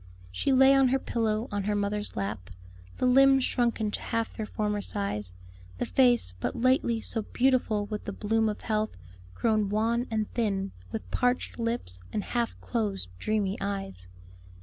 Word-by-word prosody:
She 95 - 0
lay 265 +1 +7
on 270 -1 +5
her 260 +2 +3
pillow 225 -2 -1
on 205 -1 -2
her 210 0 +1
mother's 205 +1 -1
lap, 100 -2 -4 0.5
the - - 0
limbs 270 +1 +6
shrunken 235 -4 +1
to - - -4
half 230 -1 -2
their 215 - -5
former 210 -1 -1
size, 105 - -3 0.5
the - - -1
face, 245 - +3
but - - -2
lately 240 -2 +2
so 225 - -3
beautiful 240 -3 +1
with 210 0 -5
the - - -3
bloom 220 +2 +1
of 210 - -5
health, 215 - -1 0.4
grown 215 - +1
wan 230 +4 +1
and 215 -2 -1
thin, 200 -4 -1 0.2
with 90 0 -6
parched 245 - 0
lips 230 - -2
and 205 - -2
half 235 -1 -2
closed, 210 - -2
dreamy 205 - 0
eyes. 195 - -4
215 Hz, 165 wpm, -28 LUFS, 200-240 Hz, 0.5 s, lay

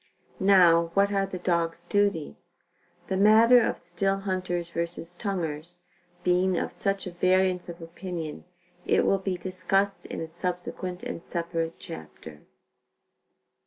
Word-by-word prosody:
Now, 175 -4 +5
what 200 +1 +4
are 195 -1 +1
the 190 - -5
dog's 170 -2 0
duties? 195 - -1 0.5
The 190 - -2
matter 225 +4 +7
of - - 0
still 180 +3 -1
hunters 180 -3 -2
vs. 170 0 -3
tonguers, 175 -4 -4 0.5
being 180 0 +2
of - - -2
such 195 -1 -2
variance 185 0 +1
of 170 0 -8
opinion, 165 -2 -6 0.4
it - - +2
will 195 - +3
be 190 -1 -2
discussed 190 +2 0
in - - -5
a 165 - -4
subsequent 180 +1 -4
and - - -5
separate 165 -1 -3
chapter. 80 -1 -10
180 Hz, 125 wpm, -27 LUFS, 170-195 Hz, 0.5 s, matter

